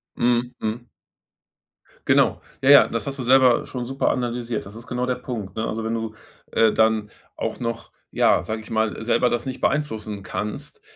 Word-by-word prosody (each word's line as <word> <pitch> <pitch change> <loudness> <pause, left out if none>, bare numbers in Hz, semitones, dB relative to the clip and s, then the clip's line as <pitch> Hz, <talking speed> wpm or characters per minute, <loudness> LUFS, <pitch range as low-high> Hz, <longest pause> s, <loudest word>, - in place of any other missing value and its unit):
Mhm. 120 0 +1
Mhm. 115 +3 -4 1.2
Genau. - - +3 0.2
Ja, 135 - +3
ja, 140 -1 +9
das 115 -2 -3
hast 140 0 -4
du 130 - -2
selber 130 -1 +5
schon 125 -2 -5
super 135 +2 0
analysiert. 120 -2 -2
Das 100 +2 -11
ist 115 +2 -11
genau 125 0 -2
der 125 - 0
Punkt, 115 -6 -6
ne? 110 0 -2
Also, 110 +1 -3
wenn 110 +1 -2
du, 115 -1 -4 0.4
äh, 115 -1 +4
dann 110 -1 +2 0.2
auch - - -4
noch, 115 -2 -4 0.2
ja, - - +3
sage 110 0 -4
ich 110 - -14
mal, 110 0 0
selber 120 +2 +2
das 120 - -1
nicht 130 -1 -5
beeinflussen 110 -8 -1
kannst, 105 - -5
115 Hz, 185 wpm, -23 LUFS, 110-125 Hz, 1.2 s, ja